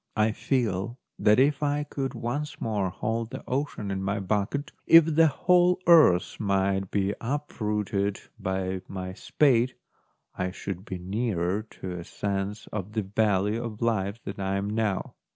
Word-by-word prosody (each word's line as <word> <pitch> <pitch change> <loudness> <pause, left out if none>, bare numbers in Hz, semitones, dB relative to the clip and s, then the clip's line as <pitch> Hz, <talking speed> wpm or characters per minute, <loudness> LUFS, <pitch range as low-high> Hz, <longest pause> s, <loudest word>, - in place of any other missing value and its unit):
I 110 +1 +3
feel 115 -2 -1 0.2
that 105 0 +5
if 140 +1 +3
I 145 0 +1
could 135 -3 -4
once 145 +6 -3
more 105 -4 -1
hold 115 +5 -2
the 130 - -7
ocean 130 -6 -2
in 95 0 -2
my 100 +2 -1
bucket, 105 +8 -1 0.2
if 165 -1 +9
the 160 0 +4
whole 180 +4 +3
earth 155 - +5
might 95 -2 +1
be 100 0 0
uprooted 105 -7 -1 0.2
by 95 -1 -2
my 95 -1 -5
spade, 125 +2 +2 0.6
I 90 0 -2
should 95 0 -6
be 95 - -5
nearer 95 0 -1
to 100 -4 -8
a - - -6
sense 100 +3 -3
of 105 0 -4
the 110 -1 0
value 105 +2 +1
of 110 -3 -6
life 105 -2 0
than 100 +1 -6
I 95 0 -1
am 100 +1 -2
now. 105 -3 -1
105 Hz, 155 wpm, -27 LUFS, 95-125 Hz, 0.6 s, if